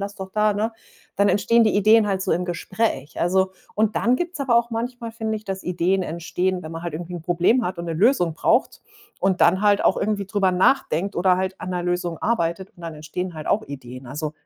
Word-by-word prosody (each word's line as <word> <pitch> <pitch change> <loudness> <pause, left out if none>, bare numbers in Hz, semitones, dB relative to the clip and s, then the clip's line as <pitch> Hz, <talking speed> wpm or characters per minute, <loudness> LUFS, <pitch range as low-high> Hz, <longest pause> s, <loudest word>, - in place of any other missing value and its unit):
lass 200 +1 -4
doch 190 -1 -8
da, 215 0 +3
ne?“ 220 +3 -1 0.4
Dann 200 0 +3
entstehen 230 +3 +3
die 215 - +2
Ideen 215 +1 +5
halt 190 -2 -1
so - - -2
im 180 +1 0
Gespräch, 175 -4 -2
also. 190 +2 +2 0.2
Und 215 0 +1
dann 240 +2 +3
gibt's 350 0 -4
aber 265 -4 +2
auch 235 0 +2
manchmal, 235 0 -4
finde 220 -1 -3
ich, 215 - -10
dass 190 -1 -5
Ideen 180 +2 0
entstehen, 180 +3 -2
wenn 160 - -8
man 165 0 -6
halt 170 - -3
irgendwie 175 +2 -6
'n 175 - -6
Problem 175 +9 +2
hat 180 -1 -3
und 170 - -5
'ne 165 - -3
Lösung 180 - +3
braucht - - +1 0.4
und 190 -1 +1
dann 185 +3 +5
halt 205 -1 +3
auch - - +4
irgendwie 200 -1 -1
drüber 195 -2 +1
nachdenkt 190 - +1
oder 180 +1 +3
halt 190 0 -3
an 185 - -5
'ner 180 -1 -2
Lösung 175 -1 -2
arbeitet 185 -4 -1
und 175 - -15
dann 165 -2 -6
entstehen 165 +4 -5
halt 155 - -7
auch 215 - +2
Ideen. 130 -2 -9
Also, 150 +4 -4
190 Hz, 230 wpm, -23 LUFS, 170-215 Hz, 0.4 s, Ideen